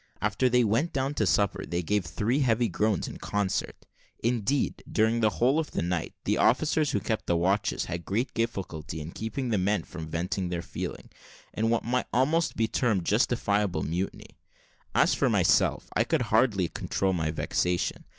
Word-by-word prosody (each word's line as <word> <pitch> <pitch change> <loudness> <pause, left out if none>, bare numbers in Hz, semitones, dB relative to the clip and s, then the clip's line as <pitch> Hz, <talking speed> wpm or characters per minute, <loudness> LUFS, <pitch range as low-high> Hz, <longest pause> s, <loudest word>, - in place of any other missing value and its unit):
After 105 +5 +1
they 125 0 +4
went 115 +10 +1
down 135 +1 -1
to 110 -8 0
supper 100 -1 +1
they 85 +1 -2
gave 105 +3 +1
three 105 - 0
heavy 120 -3 +2
groans 105 0 0
in - - -7
concert; 100 -2 -2 0.3
indeed, 120 +3 0
during 110 +1 +2
the 110 -2 +4
whole 130 +6 +3
of 160 - -2
that - - -2
night, 85 -1 -2
the - - 0
officers 150 +4 +3
who - - 0
kept 110 -2 -3
the 85 - +2
watches 95 +3 +1
had 85 0 -5
great 115 +9 -1
difficulty 90 -9 -3
in 75 +2 -7
keeping 115 +6 -4
the 110 -4 +1
men 100 +3 +1
from 80 -3 -8
venting 90 +3 -2
their 85 -1 -3
feeling, - - -6 0.4
in 110 +1 0
what 115 0 +1
might 125 +2 0
be - - 0
almost 160 +6 +2 0.2
termed 110 -10 +1
justifiable 105 -5 +1
mutiny. 90 +5 -4 0.6
As - - +4
for - - +2
myself, - - +2
I - - +4
could - - 0
hardly 100 -8 +3
control 95 +3 -1
my 80 -3 0
vexation. 90 +2 -1
105 Hz, 180 wpm, -28 LUFS, 90-120 Hz, 0.6 s, they